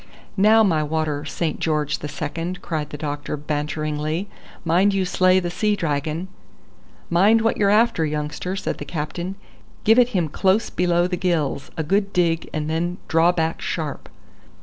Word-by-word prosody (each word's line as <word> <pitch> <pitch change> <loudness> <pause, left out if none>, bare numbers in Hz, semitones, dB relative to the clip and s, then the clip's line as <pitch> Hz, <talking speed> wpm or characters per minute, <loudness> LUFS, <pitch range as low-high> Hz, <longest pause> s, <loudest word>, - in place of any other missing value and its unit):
"Now 215 +3 +5
my 165 -7 +2
water 150 -1 -2
Saint 165 -2 -2
George 150 -2 0
the 150 - -5
Second," 165 +5 -5
cried 155 -3 -3
the 145 - -7
doctor 145 0 -4
banteringly; 150 +3 -2 0.4
"mind 185 +5 +3
you 190 -1 +1
slay 185 +1 +3
the 175 -1 -3
sea 210 +3 +1
dragon." 155 0 -2 0.8
"Mind 205 +6 +5
what 225 - +1
you're 200 -1 +3
after, 210 -5 +3
youngster," 150 +4 -3
said - - -3
the - - -4
captain. 170 +4 -4 0.5
"Give 225 +3 +5
it 245 -1 +5
him 180 -8 0
close 190 +8 +1
below 175 -1 +2
the 180 0 -2
gills; 165 -7 -1
a 160 - 0
good 195 +5 0
dig 165 -2 +1
and 155 -1 -3
then 170 +3 -1
draw 165 +2 +4
back 165 -2 -1
sharp." 155 -4 -4
170 Hz, 165 wpm, -22 LUFS, 155-185 Hz, 0.8 s, Now